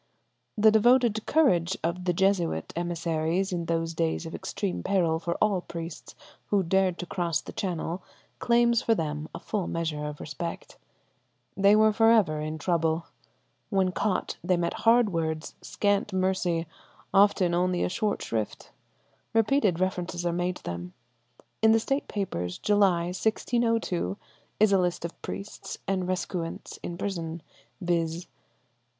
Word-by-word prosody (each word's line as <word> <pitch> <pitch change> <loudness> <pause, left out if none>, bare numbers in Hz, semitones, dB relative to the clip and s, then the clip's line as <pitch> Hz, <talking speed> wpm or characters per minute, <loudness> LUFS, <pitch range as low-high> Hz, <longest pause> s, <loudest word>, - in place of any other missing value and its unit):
The 215 +1 +6
devoted 230 0 +4
courage 190 - +3
of 175 +2 -2
the 180 - +3
Jesuit 175 - +1
emissaries 170 +2 -1
in 170 -1 -2
those 165 0 -1
days 80 - -1
of - - -7
extreme 90 -1 -3
peril 165 - +1
for 170 0 -2
all 205 -4 +1
priests 165 -2 -8 0.3
who 200 -2 +2
dared 185 0 +2
to 180 - -5
cross 170 -3 -1
the - - -10
channel 180 -1 -3 0.4
claims 235 0 +3
for 230 -3 +2
them 150 -3 -3
a - - -5
full 200 -5 -3
measure 160 -3 -2
of 150 0 -6
respect. 165 +3 -6 0.8
They 200 +2 +5
were 215 0 +5
for 225 +1 +5
ever 185 -10 +3
in 155 +1 -3
trouble. 165 0 0 0.6
When 190 -3 +2
caught 190 +1 -1
they 180 -2 +2
met 170 0 -1 0.2
hard 230 -4 +4
words, 160 -1 -2
scant 205 0 0
mercy, 185 -3 0 0.5
often 195 -3 +4
only 180 0 +1
a - - +2
short 205 +3 -1
shrift. 110 -2 -4 0.6
Repeated 225 - +3
references 180 -2 -2
are 170 - +1
made 175 +1 -1
to - - -13
them. 85 +1 -6 0.7
In 220 0 +6
the 225 - +4
State 275 +5 -1
Papers, 90 - -3
July, 200 -5 +3
1602, 220 - 0 0.4
is 215 -1 +5
a 195 - +5
list 175 -1 -1
of 170 - -8
priests 200 +1 -6
and 190 -2 0
recusants 180 -2 -4
in 170 - -5
prison, 170 -4 -4 0.4
viz. 170 -2 -1
180 Hz, 145 wpm, -27 LUFS, 165-205 Hz, 0.8 s, The